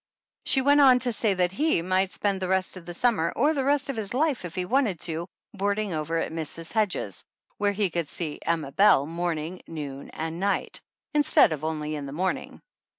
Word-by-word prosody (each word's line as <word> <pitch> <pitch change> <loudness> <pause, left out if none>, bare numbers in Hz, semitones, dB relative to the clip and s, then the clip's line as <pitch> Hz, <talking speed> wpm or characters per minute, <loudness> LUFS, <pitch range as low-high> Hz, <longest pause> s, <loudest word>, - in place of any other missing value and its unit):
She 265 - +3
went 285 +2 +5
on 260 -3 +7
to 250 -1 +2
say 215 -3 +1
that 180 -1 +1
he 285 - +1
might 185 +1 +1
spend 195 -1 -1
the 185 - -1
rest 190 0 +1
of 180 -2 -11
the 175 - -5
summer, 175 -7 +2
or 290 +6 +3
the 275 -3 -1
rest 285 0 +2
of 275 - -2
his 215 +1 -3
life 290 -4 +1
if 175 0 -8
he 180 -1 -1
wanted 225 - +1
to, 165 +1 -3 0.3
boarding 205 -1 -1
over 160 +1 -2
at 165 - -2
Mrs. 165 0 -5
Hedges' 205 - -1 0.4
where 205 0 +2
he 200 -3 0
could 170 -2 -2
see 155 -1 -4
Emma 160 -4 -1
Belle 165 -6 +5
morning, 170 +1 -3
noon 140 -4 -7
and 160 +1 -5
night, 200 +1 -1 0.3
instead 295 - +5
of 155 -1 -6
only 155 -1 -2
in 145 -2 -4
the 135 - -7
morning. 185 +1 -3
185 Hz, 210 wpm, -26 LUFS, 160-220 Hz, 0.4 s, on